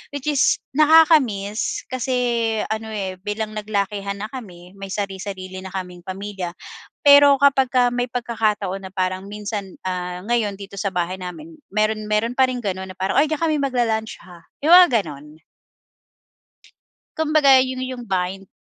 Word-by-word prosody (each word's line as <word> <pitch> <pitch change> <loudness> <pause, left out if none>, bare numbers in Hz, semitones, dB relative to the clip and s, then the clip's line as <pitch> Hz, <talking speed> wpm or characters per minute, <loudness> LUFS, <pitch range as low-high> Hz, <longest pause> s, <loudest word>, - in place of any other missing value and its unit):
Which 285 +1 -6
is 280 - +3 0.2
nakaka-miss 295 - +3
kasi 255 0 -1 0.6
ano, 220 0 -3
eh, 190 -3 -4
bilang 210 +2 -4
naglakihan 200 -1 -2
na 215 - -4
kami 180 -8 -10
may 195 - -6
sari-sarili 190 -2 -5
na 190 0 -9
kaming 180 -2 -6
pamilya, 190 -2 -6 0.5
pero 285 -1 +8
kapagka 260 -3 +4
may 245 0 -1
pagkakataon 210 -5 -2
na - - -14
parang 185 +1 -2
minsan, 205 -2 -6
ah, 180 0 -4
ngayon 220 -4 0
dito 200 0 -10
sa 200 - -1
bahay 180 +2 -2
namin 305 - -8 0.2
meron 215 0 0
meron 220 +3 +1
pa 260 -1 +4
rin 250 -1 -3
ganon 190 -1 -3
na - - -13
parang, 190 +7 +1
"Oy, 300 - +4
diyan 310 +1 -3
kami 310 -2 +1
mag-la-lunch 235 -5 -1
ha?" 175 -2 -15 0.2
Yung 320 - +3
mga 260 - +6
ganon. 150 +1 -11 1.8
Kumbaga 300 -4 +5
yun, 255 0 -1
yung 255 -2 -6
bind. 190 0 -2
210 Hz, 150 wpm, -21 LUFS, 190-255 Hz, 1.8 s, pero